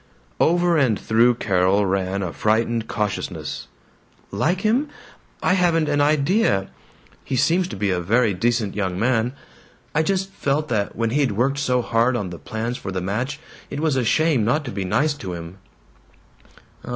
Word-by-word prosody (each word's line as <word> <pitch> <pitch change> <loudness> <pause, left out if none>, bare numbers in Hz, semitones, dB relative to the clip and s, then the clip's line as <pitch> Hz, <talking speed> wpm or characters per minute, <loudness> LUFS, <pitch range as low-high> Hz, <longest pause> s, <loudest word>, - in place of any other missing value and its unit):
Over 175 0 +3
and 125 -8 +2
through 115 +2 +3
Carol 95 -1 +2
ran 95 +1 -1
a 90 - -4
frightened 115 +1 0
cautiousness. 105 -1 -3 0.6
"Like 180 +4 0
him? 245 +7 +1 0.5
I - - +3
haven't 170 -4 +2
an 145 -1 +1
í 145 -1 +3
dea. 140 - +2 0.5
He 135 - -3
seems 175 +8 +2
to - - -7
be 100 0 0
a 90 - 0
very 110 +4 +2
decent 115 +2 0
young 95 -3 -2
man. 120 +2 +1 0.6
I 150 - +3
just 190 +3 -1
felt 150 -2 -1
that 105 -4 -1
when 115 0 -1
he'd 140 -4 +1
worked 135 +6 0
so 125 -3 +1
hard 115 +3 +2
on 100 -6 -3
the 85 - -8
plans 115 +3 -4
for 95 - -5
the 95 - -2
match, 120 +10 -3 0.3
it 140 - -5
was 155 -3 +1
a 130 - +1
shame 140 +1 +2
not 145 +8 +1
to 125 - -5
be 100 -3 -3
nice 140 +11 +1
to 95 -11 -7
him." 85 +3 -8
120 Hz, 175 wpm, -22 LUFS, 100-150 Hz, 0.6 s, Over